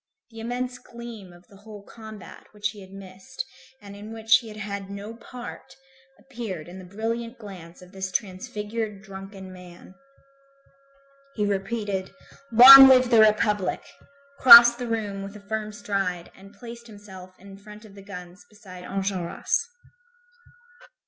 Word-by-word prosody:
The 225 - -12
immense 250 +2 -5
gleam 235 -5 -12
of 175 +1 -19
the 200 - -19
whole 205 0 -13
combat 220 -2 -13
which 210 0 -3
he 205 -1 -14
had 190 0 -15
missed, 195 - -10 0.3
and 200 -1 -13
in 210 +2 -11
which 225 0 +3
he 235 - -13
had 215 -1 -11
had 200 -2 -7
no 200 +2 -8
part, 240 +1 -11 0.4
appeared 225 - -8
in 180 +2 -11
the 185 - -12
brilliant 230 +5 -5
glance 185 -5 -13
of 180 - -17
the 195 - -13
transfigured 210 +1 -5
drunken 195 -1 -11
man. 180 0 -15 1.4
He 210 - -1
repeated: 200 -1 -3 0.4
"Long 265 +4 +11
live 255 -1 +4
the 230 - +5
Republic!" 210 -3 +1 0.6
crossed 235 -1 +9
the 245 - -5
room 210 -4 -4
with 200 +1 -9
a - - -10
firm 215 0 -4
stride 195 -4 -4
and 195 +1 -16
placed 235 +2 -12
himself 190 -4 -14
in 195 0 -14
front 210 +2 -14
of 205 - -16
the 200 - -14
guns 180 -2 -12
beside 190 -4 -14
Enjolras. 190 - -3
205 Hz, 150 wpm, -24 LUFS, 195-225 Hz, 1.4 s, Long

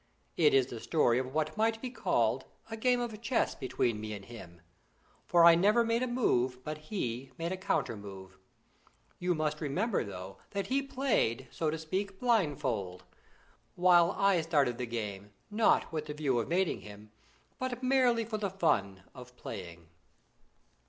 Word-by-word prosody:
It 150 -4 +4
is 135 -2 +5
the 120 -2 -8
story 125 -3 +2
of 130 0 -4
what 155 +1 -1
might 225 +1 +1
be 250 +1 -5
called - - 0 0.3
a - - -2
game 245 +2 +2
of 225 -3 -4
chess 235 +1 +1
between 120 -4 -1
me 110 0 -5
and 100 -2 -8
him; 95 -7 -11 0.7
for 170 -1 +6
I 170 - +10
never 210 +7 +4
made 230 +1 +1
a 255 - 0
move, 130 - 0
but 155 +2 -5
he 130 - -3
made 165 +1 -3
a - - -1
counter 185 -10 -1
move. 95 -2 -11 0.8
You 180 0 +1
must 155 0 -2
remember 185 +9 0
though 95 -2 -8 0.2
that 200 - 0
he 270 +2 +1
played, 255 - 0
so 160 - -1
to 160 - -2
speak, 190 +5 -3
blindfold, 145 - 0 0.7
while 175 -1 +5
I 195 -3 +3
started 145 -7 +1
the 125 - -2
game, 105 -3 -5 0.2
not 215 +1 +3
with 155 -2 -3
the 150 - -5
view 140 -5 +1
of 115 - -2
mating 180 +1 0
him, 105 +1 -12 0.5
but 255 0 -3
merely 255 -3 +3
for 215 -1 -4
the 200 -2 -1
fun 100 - 0
of 125 -1 -12
playing. 85 -3 -8
155 Hz, 170 wpm, -31 LUFS, -, 0.8 s, I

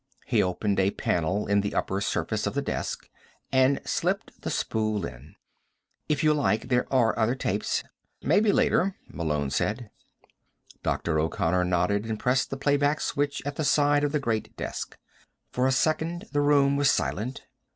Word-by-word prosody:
He - - +2
opened 100 +2 0
a 95 0 +3
panel 95 +1 -1
in 100 0 +2
the 100 - -3
upper 95 +1 -1
surface - - -1
of - - -3
the - - +1
desk, - - -4 0.4
and 130 +1 +4
slipped - - -2
the - - -3
spool 110 -4 -1
in. 70 +3 -11 0.7
"If 150 -1 +1
you 155 0 +5
like, 125 -5 0
there 125 -1 +1
are 125 -4 +3
other 115 +3 +2
tapes 130 - -1 0.2
" - - -48
"Maybe 210 0 +5
later," 200 -6 +2
Malone 75 -4 -2
said. 110 - -2 0.9
Dr. 80 -2 0
O'Connor 80 +3 +1
nodded 90 +4 +1
and 110 -1 -3
pressed 125 +1 +1
the 135 - -4
playback 145 +2 +2
switch 145 0 -1
at 145 0 -4
the 155 - 0
side 145 0 +3
of 145 - +1
the 150 - +1
great 115 -5 -2
desk. - - -5 0.5
For 125 +1 +1
a - - +2
second 160 +6 0
the 145 - +1
room 140 -1 +4
was 140 -1 +4
silent. 125 +5 -1
125 Hz, 170 wpm, -27 LUFS, 100-145 Hz, 0.9 s, you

